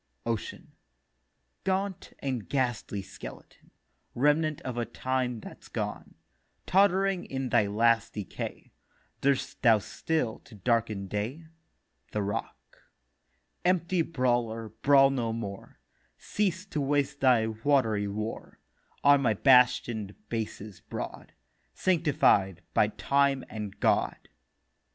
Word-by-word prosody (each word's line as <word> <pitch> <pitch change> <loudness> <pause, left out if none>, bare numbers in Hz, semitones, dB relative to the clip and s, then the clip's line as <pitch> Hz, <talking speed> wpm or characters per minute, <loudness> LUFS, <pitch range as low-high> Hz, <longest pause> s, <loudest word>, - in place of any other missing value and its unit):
OCEAN: 115 -2 -4 0.9
'Gaunt 190 -1 -2
and 130 -6 -4
ghastly 120 -7 -1
Skeleton, 95 - -12 0.5
Remnant 150 +3 +2
of 130 -2 -5
a 120 - 0
time 125 +1 -2
that's - - -11
gone, - - -5 0.5
Tott'ring 195 -1 +3
in 135 -1 -3
thy 105 - +3
last 115 +2 +2
decay 105 -3 -6 0.5
Durst 140 -1 0
thou 115 -3 +6
still 125 +3 -2
to 115 - -16
darken 110 -1 0
day?' 110 - -4 0.7
THE 105 - 0
ROCK: 100 +1 -6 0.8
'Empty 180 0 +2
Brawler, 120 -7 0
brawl 135 -1 +6
no 120 -4 -1
more; 100 -4 -7 0.4
Cease 190 -2 -1
to 155 -7 -3
waste 145 0 0
thy 125 -4 +4
watery 110 -2 +1
war 105 +3 -5 0.5
On 145 -1 +6
my 115 -5 +2
bastion'd 120 -4 +4
Bases 110 -4 -5
broad, - - -7 0.4
Sanctified 135 - +2
by 105 - +4
Time 140 +4 +1
and 105 -2 -6
God. - - +1
125 Hz, 110 wpm, -29 LUFS, 110-145 Hz, 0.9 s, thou